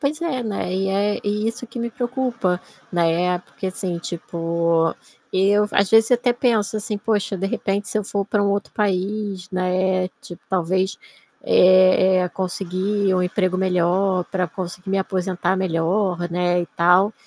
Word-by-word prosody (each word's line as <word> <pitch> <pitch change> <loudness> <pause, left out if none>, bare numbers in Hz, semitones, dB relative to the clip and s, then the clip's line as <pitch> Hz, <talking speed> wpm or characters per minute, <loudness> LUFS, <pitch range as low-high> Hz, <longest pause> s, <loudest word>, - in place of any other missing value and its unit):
Pois 295 +2 -1
é, 260 -7 -1
né, 200 -4 -3
e 195 +1 0
é 205 +2 0
e 210 +2 0
isso 245 +2 -6
que 235 +1 -9
me 235 0 -2
preocupa. 240 -7 -1 0.3
Na 175 -1 +2
época, 180 +3 -1
assim, 185 -2 -3
tipo, 170 -1 -1 0.4
eu, 200 +2 +3
às 200 -1 +2
vezes, 225 +2 +5
até 245 0 +3
penso, 230 -4 +1
assim: 210 0 -3
"Poxa, 205 -2 -1
de 190 +1 -2
repente, 200 +1 -2
se - - -1
eu 210 - -3
for 200 0 -2
para 205 +1 0
um 200 - +2
outro 200 0 -2
país, 200 -1 -2
né, 185 0 0
tipo, 175 - -11
talvez, 185 +1 0 0.5
eh 185 0 +5
eh, - - -2
conseguir 190 +2 -1
um 185 - +2
emprego 185 0 0
melhor, 185 0 +1
para 185 -2 -1
conseguir 180 +1 -6
me 195 - +1
aposentar 185 -1 -1
melhor, 175 0 0
né, 175 0 +1
e - - -5
tal". 180 +5 +4
190 Hz, 165 wpm, -21 LUFS, 180-210 Hz, 0.5 s, vezes